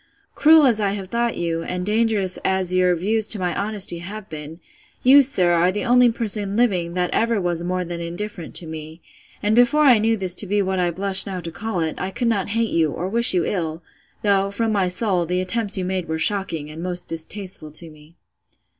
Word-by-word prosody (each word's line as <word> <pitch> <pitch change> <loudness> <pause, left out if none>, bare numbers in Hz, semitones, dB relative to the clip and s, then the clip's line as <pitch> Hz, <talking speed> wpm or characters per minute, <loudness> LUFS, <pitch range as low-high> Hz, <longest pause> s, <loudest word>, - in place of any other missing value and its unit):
Cruel 315 -1 +5
as 230 -5 +2
I 200 -1 0
have 195 -2 -6
thought 235 +1 -1
you, 165 -1 -2
and 180 +1 -5
dangerous 210 -3 0
as 190 -1 +1
your 180 -1 +2
views 210 +5 0
to 220 - 0
my 180 -2 -2
honesty 200 -4 0
have 200 +4 -9
been; 155 +1 -9 0.4
you, 275 +3 +7
sir, 185 -10 +2
are 175 +1 +2
the 210 +6 -4
only 250 0 +4
person 210 -3 +1
living 180 -8 0
that 180 -1 -1
ever 230 -1 0
was 175 -2 -2
more 180 +1 -2
than 170 0 -6
indifferent 175 +1 -6
to 175 - +4
me: 160 0 -9 0.4
and 210 +1 +1
before 245 +6 +4
I 250 -6 +6
knew 225 +1 +1
this 185 -3 +3
to 205 - 0
be 205 +2 0
what 190 -1 -1
I 175 -1 +1
blush 195 +3 +4
now 190 -2 -4
to 165 0 -7
call 200 +1 -4
it, 160 -1 -3
I 190 - -3
could 235 +5 -3
not 205 -4 -1
hate 230 -1 0
you, 160 -2 +1
or 175 +5 -4
wish 235 -1 +4
you 175 - +1
ill, 165 -3 -3 0.4
though, 200 -1 +2
from 220 +3 -1
my 195 -3 +1
soul, 180 -2 -1
the 180 +1 -1
attempts 205 +2 0
you 185 - -2
made 185 -1 -3
were 160 - -3
shocking, 165 -4 -1
and 160 +2 -9
most 180 0 -3
distasteful 165 0 -3
to 160 +2 -7
me. 155 +2 -19
190 Hz, 220 wpm, -21 LUFS, 175-215 Hz, 0.4 s, you